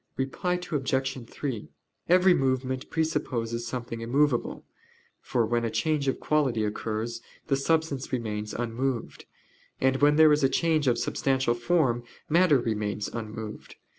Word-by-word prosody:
Reply 180 +7 -1
Obj. 135 -7 -2
3: 130 -7 -5 0.4
Every 180 +1 +6
movement 130 -2 -1
presupposes 125 -8 -1
something 120 -1 -5
immovable: 130 +2 0 0.6
for 120 -2 0
when 120 +1 0
a 115 - 0
change 140 +6 0
of 135 - 0
quality 135 -8 +1
occurs, 110 +2 -3 0.2
the 140 - +1
substance 145 -1 0
remains 105 -4 -3
unmoved; 120 +1 -3 0.5
and 130 0 +2
when 145 +2 +4
there 155 0 +7
is 145 0 +1
a 135 - +5
change 155 -1 +1
of 120 -2 +3
substantial 130 -3 +1
form, 120 -1 +1 0.3
matter 170 -2 +5
remains 105 -3 -2
unmoved. 110 -1 -7
130 Hz, 135 wpm, -27 LUFS, 115-150 Hz, 0.6 s, there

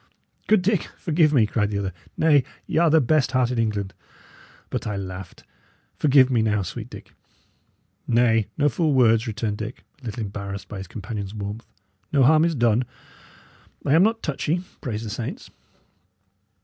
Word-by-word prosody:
"Good 210 -4 +4
Dick, 200 -2 +1
forgive 160 -2 +2
me," 125 -7 +4
cried 105 -1 0
the 105 - -2
other. 95 -2 -3 0.2
"Nay, 150 -4 +4 0.2
y' - - -2
are 170 -1 +4
the 160 +1 +5
best 150 0 +2
heart 130 -1 +2
in 125 - -1
England; 105 -4 -1
I - - -36 0.7
but - - -3
laughed. 95 -3 -6 0.5
Forgive 135 -3 +4
me 120 -3 +3
now, 105 -2 +1
sweet 90 - -7
Dick." - - -12 0.9
"Nay, 115 -2 +3
no 145 - +3
fool 150 +1 +1
words," 115 -2 +4
returned 105 -1 -2
Dick, 110 +3 -6 0.2
a - - -14
little 110 +1 -4
embarrassed 100 -1 -6
by 100 - -7
his 95 - -7
companion's 100 0 -6
warmth. 105 +2 -6 0.4
"No 140 -2 +4
harm 155 +4 +5
is 170 -2 0
done. 120 -1 +2 1.0
I 140 - +3
am 165 - +6
not 225 +3 +2
touchy, 155 +4 -1 0.2
praise 115 -5 -4
the 110 - -5
saints." 115 +1 -6
115 Hz, 170 wpm, -24 LUFS, 105-150 Hz, 1.0 s, am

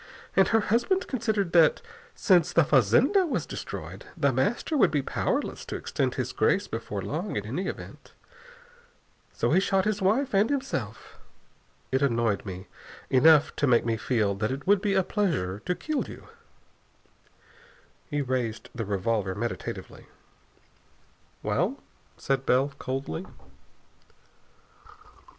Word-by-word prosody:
And 190 -1 +5
her 225 -1 +3
husband 240 - +1
considered 215 -7 -1
that, 165 -2 +5 0.4
since 180 -6 +3
the 170 - +4
fazenda 150 - +4
was 295 - -2
destroyed, - - -7
The - - +2
Master 320 - 0
would 225 - +5
be 150 -3 0
powerless - - -2
to - - -5
extend - - -2
his - - -2
grace - - +1
before 100 -2 -5
long, 160 - -3
in 105 - -2
any 170 - -3
event. - - -8 1.2
So - - -1
he - - +5
shot 195 0 +1
his 210 -1 -1
wife 220 +8 +1
and 200 +3 +3
himself. 135 - -4 0.7
It 130 - +1
annoyed 115 -6 +1
me 95 0 -7 0.5
enough 150 +3 +5
to 145 - +1
make 120 -3 +4
me 115 -1 +1
feel 110 -2 0
that 110 +1 -1
it 135 +2 -5
would 200 0 +4
be 200 -1 0
a 190 - +3
pleasure 145 - -1
to 180 - +1
kill 310 - -2
you." - - -11 1.8
He 145 -1 -1
raised 125 -4 -3
the 115 -2 -4
revolver 100 -1 -1
meditatively. 115 +2 -5 1.4
"Well?" - - 0 0.4
said 135 -1 -1
Bell 135 +3 +2
coldly. 130 -10 -4
145 Hz, 135 wpm, -27 LUFS, -, 1.8 s, And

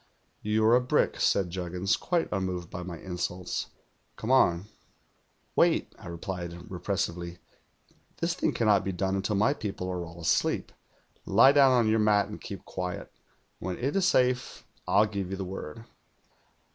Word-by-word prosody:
'"You're 110 +2 +3
a 125 - +4
brick,' 125 - +1
said 95 -3 +2
Juggins, 90 +3 -1
quite 175 -2 0
unn:oved 90 -3 -3
by 90 - -5
my 90 -1 -6
insults. 90 0 -4 0.5
'Come 110 - -3
on.' 90 -9 +4 0.9
"'Wait,' - - +3
I - - -11
replied 85 +1 -5 0.2
repressively. 90 -2 -3 0.8
'This 170 0 0
thing 185 - 0
can 115 - -1
not 105 -2 +4
be 95 - -2
done 95 +1 -1
until 100 +2 -1
my 105 +7 +3
people 100 -8 -5
are 90 -1 -3
all 85 0 -10
asleep. 80 - +1 0.6
Lie 115 +7 +7
down 140 -2 +6
on 120 -3 +3
your 110 +1 +3
mat 105 -1 +3
and - - -8
keep - - -8
quiet. 90 -1 -5 0.5
When 90 0 -4
it 135 +7 -2
is 190 -2 +3
safe, 125 -6 +1 0.2
I'll 105 - +5
give 100 -3 -4
you 95 - -4
the 95 - -4
word.' 95 +3 -7
95 Hz, 160 wpm, -28 LUFS, 90-110 Hz, 0.9 s, Lie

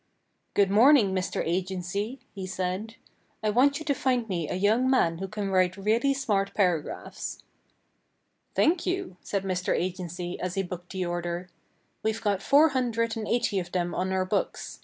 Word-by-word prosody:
"Good 200 -1 +4
morning, 225 -2 +6
Mr. 185 -1 -1
Agency," 190 +7 -2
he 190 -2 -5
said. 190 +4 -3 0.5
"I 215 - +2
want 275 +5 +4
you 315 - -7
to 290 - +2
find 250 -4 0
me 170 -6 -2
a - - -2
young 220 +7 +3
man 170 -11 +2
who 195 - -3
can 205 -1 -3
write 185 0 +2
really 225 +7 +2
smart 200 -7 0
paragraphs." 180 -7 -1 1.1
"Thank 335 +2 +2
you," 365 - -2
said 200 -1 -2
Mr. 185 -1 0
Agency 180 -1 -3
as 180 -1 -3
he 195 - +1
booked 180 -1 -7
the 185 -1 -1
order. 175 +1 -3 0.5
"We've 220 0 -1
got 205 -3 0
four 290 +8 +5
hundred 230 -4 0
and 220 -2 -4
eighty 235 -4 +1
of 175 -1 -7
them 175 -1 0
on 185 +2 -1
our 190 0 +1
books. 200 +2 -2
195 Hz, 170 wpm, -27 LUFS, 180-230 Hz, 1.1 s, morning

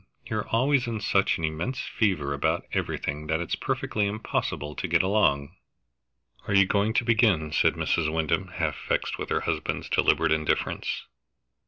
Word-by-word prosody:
You're 110 -1 -3
always 130 +2 +2
in 115 -2 -2
such 100 -1 +2
an 80 - -7
immense 80 +12 -2
fever 85 -11 0
about 70 - 0
everything 75 +2 -2
that 80 +1 0
it's 85 - -3
perfectly 105 -1 -1
impossible 100 -7 -3
to 90 - -4
get 85 0 +3
along." 95 -9 +1 0.9
"Are 100 - +1
you 95 0 +7
going 100 +3 +1
to 120 - +1
begin?" 105 -10 +3
said - - +3
Mrs. 80 -2 0
Wyndham, 80 -1 0
half - - -2
vexed - - 0
with - - -4
her - - +1
husband's - - -2
deliberate 80 -1 +3
indifference. 80 -1 -1
95 Hz, 160 wpm, -26 LUFS, 80-110 Hz, 0.9 s, you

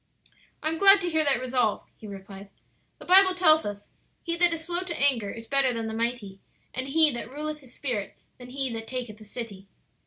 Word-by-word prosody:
"I 310 - +1
am 325 0 -4
glad 395 0 +9
to 355 - -1
hear 315 -1 +2
that 275 -4 +3
resolve," 250 -4 -1
he 215 - -12
replied. 195 0 -11 0.5
"The - - -13
Bible 375 +1 +6
tells 315 - +4
us, 205 0 -8 0.3
'He 335 0 -2
that 350 0 +4
is 325 -1 -4
slow 350 +1 -2
to 360 -2 -5
anger 255 -7 +2
is 230 +2 -8
better 275 +2 +2
than 230 -1 -3
the 220 - -5
mighty; 225 -4 -3 0.3
and 260 +2 -4
he 310 +1 +4
that 240 -2 -6
ruleth 300 +2 -6
his 255 -3 -15
spirit 240 -8 -4 0.2
than 250 0 -11
he 265 -1 -3
that 225 0 -6
taketh 240 -4 -6
a - - -12
city.'" 205 -3 -8
255 Hz, 215 wpm, -26 LUFS, 225-315 Hz, 0.5 s, glad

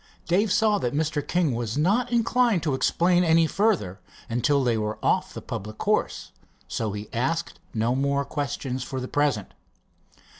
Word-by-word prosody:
Dave 190 +4 +2
saw 215 -1 +3
that 125 +2 -2
Mr. 155 0 0
King 165 -2 0
was 115 +1 -3
not 210 +11 +2
inclined 235 -4 +2
to 150 -4 0
explain 175 +6 +2
any 165 -1 +4
further 180 - 0 0.3
until 140 +4 +2
they 120 -2 +2
were 105 0 -2
off - - +1
the - - -8
public 110 +2 -6
course, - - -1 0.4
so 110 -2 -2
he 105 0 -6
asked 165 +8 -2 0.2
no 115 +2 +1
more 140 +1 0
questions, 135 -2 -3
for 130 +1 -5
the 130 - -4
present. 140 -9 0
145 Hz, 160 wpm, -25 LUFS, 120-175 Hz, 0.4 s, any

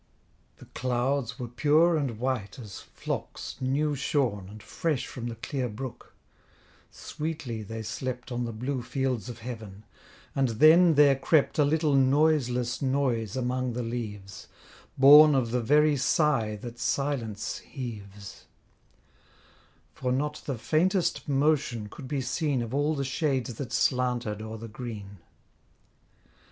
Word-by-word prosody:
The - - -14
clouds 125 0 -1
were 125 - -5
pure 150 +7 +3
and 135 -8 -1
white 125 -2 -2
as 105 -7 -9
flocks - - -6
new 145 +4 +1
shorn, 130 -8 -1
And 105 0 -11
fresh 150 +6 -2
from 120 -1 -6
the 115 - -5
clear 125 +2 -3
brook; 120 +4 -8 0.7
sweetly 150 -8 -5
they 110 +2 -6
slept 125 +3 -5
On 120 0 -2
the 120 - -3
blue 125 +4 -3
fields 125 -1 -2
of 120 - -7
heaven, 110 -4 -8 0.5
and 135 -1 +2
then 160 +3 +7
there 140 -1 +6
crept 145 +3 +2
A - - +6
little 150 +1 +2
noiseless 135 -3 +2
noise 130 -6 0
among 125 0 -1
the 125 +1 -3
leaves, 105 -5 -6 0.5
Born 145 +2 +9
of 120 -4 +1
the 125 0 +1
very 150 +4 +4
sigh 125 -5 +1
that 120 +3 -9
silence 125 -7 -2
heaves: 105 -7 -9 1.5
For 125 -1 -2
not 150 +3 -1
the 135 -4 -2
faintest 155 - +1
motion 135 -6 +1
could 130 +5 -10
be 140 0 -2
seen 130 0 -1
Of 115 +1 -7
all 145 +3 +1
the 140 - -2
shades 135 -2 -1
that 120 +1 -6
slanted 125 -5 0
o'er 110 0 -6
the 115 +1 -8
green. 105 -4 -8
125 Hz, 140 wpm, -28 LUFS, 115-145 Hz, 1.5 s, Born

